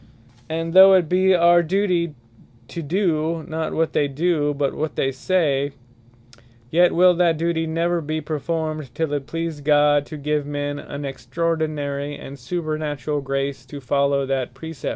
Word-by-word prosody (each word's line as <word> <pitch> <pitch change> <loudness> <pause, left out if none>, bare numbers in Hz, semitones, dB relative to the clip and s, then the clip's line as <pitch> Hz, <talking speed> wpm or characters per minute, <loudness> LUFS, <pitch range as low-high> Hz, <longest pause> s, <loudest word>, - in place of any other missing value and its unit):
And 165 +1 -3
though 190 +1 +9
it 180 -4 +3
be 185 +2 +3
our 175 0 +5
duty 175 -2 0 0.5
to 170 - -5
do, 165 -1 -1
not 160 0 -3
what 160 0 0
they 145 - +2
do, 150 +1 0
but 140 -1 -1
what 155 +1 -3
they 135 - 0
say; 140 -2 0 1.0
yet 175 +2 +4
will 180 +1 +6
that 170 -2 +2
duty 165 0 -1
never 170 +2 0
be 155 +1 -3
performed, 155 -2 -4
till 160 -3 -1
it 140 -1 -3
please 165 -2 -4
God 145 0 +3
to 155 - -7
give 150 0 -1
men 145 0 -3
an 145 0 -7
extraordinary, 145 +1 -3
and 140 - -9
supernaturall 150 0 -3
grace 135 -1 -3
to 145 +2 -8
follow 140 +1 +1
that 130 -2 -2
Precept. 160 0 -6
155 Hz, 155 wpm, -22 LUFS, 140-165 Hz, 1.0 s, though